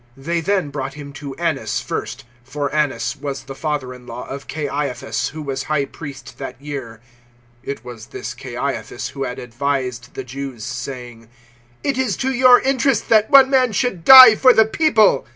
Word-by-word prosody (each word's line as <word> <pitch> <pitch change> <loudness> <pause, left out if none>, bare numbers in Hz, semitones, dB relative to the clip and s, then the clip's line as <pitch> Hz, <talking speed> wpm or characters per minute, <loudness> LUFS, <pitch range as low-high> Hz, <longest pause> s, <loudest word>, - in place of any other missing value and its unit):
018:013 135 - -16
They 170 0 -1
then 190 -3 0
brought 135 -1 -5
Him 140 -1 -10
to 140 -1 -8
Annas 140 -10 -2
first; 115 +5 -5 0.2
for 140 +2 -4
Annas 150 -1 -1
was 140 -2 -5
the 135 - -9
father 145 -3 -3
in 125 -1 -15
law - - -7
of 140 +1 -8
Caiaphas 140 -4 -3
who 155 0 -8
was 135 -2 -4
High 145 -2 +1
Priest 140 -4 -11
that 125 - -7
year. 135 -6 -7 0.6
018:014 - - -8
(It 130 -4 -6
was 120 -3 -9
this 120 - -7
Caiaphas 120 -1 -5
who 135 -1 -5
had 125 -1 -5
advised 125 0 -4
the 135 - -5
Jews, 130 -2 -7
saying, 120 -2 -7 0.5
"It 275 -2 -1
is 250 -7 0
to 265 0 -1
your 250 0 +6
interest 265 -2 0
that 220 -1 +4
one 275 -2 +7
man 255 -4 +3
should 195 -6 -1
die 260 -1 +11
for 255 +2 +5
the 220 - +5
People.") 220 - +2
140 Hz, 185 wpm, -19 LUFS, 125-190 Hz, 0.6 s, die